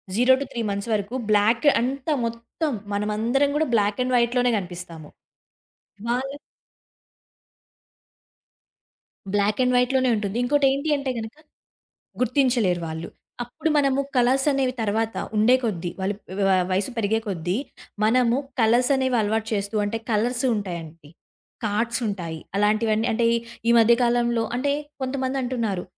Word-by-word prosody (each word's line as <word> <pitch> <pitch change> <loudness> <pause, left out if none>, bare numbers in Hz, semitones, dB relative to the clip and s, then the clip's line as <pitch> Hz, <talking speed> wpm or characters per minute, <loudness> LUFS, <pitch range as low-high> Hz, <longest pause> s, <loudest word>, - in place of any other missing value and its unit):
0-3 235 -4 +1
వరకు 210 +3 -2
బ్లాక్ 220 +7 +3
అంతా, 275 +4 -1
మొత్తం 230 +7 -4 0.2
మనందరం 220 +7 +1
గూడా 315 -1 +1
బ్లాక్ 205 +1 +1
అండ్ 255 0 -2
వైట్‌లోనే 245 +1 +2
గనిపిస్తాము. 175 -4 -7 1.0
వాళ్ళు 270 +3 -2 3.0
బ్లాక్ 205 +2 +1
అండ్ 250 - +2
వైట్‌లోనే 255 +1 +2
ఉంటుంది. 210 0 -3
ఇంకోటి 285 +3 +2
ఏంటంటే 280 -1 -1
గనక, 220 +4 -7 0.9
గుర్తించలేరు 245 - +2
వాళ్ళు. 160 +1 -6 0.3
అప్పుడు 245 +6 -3
మనము 275 -1 +2 0.2
కలర్స్ 260 +3 +3
అనేవి 270 -2 0
తరువాత, 220 +1 -1 0.2
ఉండే 225 +4 +5
కొద్దీ, 180 -6 -2
వాళ్ళు 195 +2 -1 0.3
వ - - +2 0.2
వయసు 195 +6 0
పెరిగే 220 0 +1
కొద్దీ, 180 -1 -2 0.5
మనము 240 +2 +3 0.2
కలర్స్ 240 +4 +3
అనేవి 260 -2 +1
అలవాటు 220 +1 -1
చేస్తూ, 200 +1 -2
అంటే 205 +2 -2
కలర్స్ 240 +4 +1
ఉంటాయండి, 170 -6 -6 0.6
కార్డ్స్ 230 +4 0
ఉంటాయి, 170 -6 -4 0.2
అలాంటివన్నీ 215 +2 +2
అంటే 235 +1 +1 0.4
ఈ - - +5
మధ్యకాలంలో 235 0 +3
అంటే 280 +2 0 0.3
కొంతమంది 260 0 -2
అంటున్నారు. 230 -7 -2
230 Hz, 115 wpm, -24 LUFS, 205-255 Hz, 3.0 s, ఉండే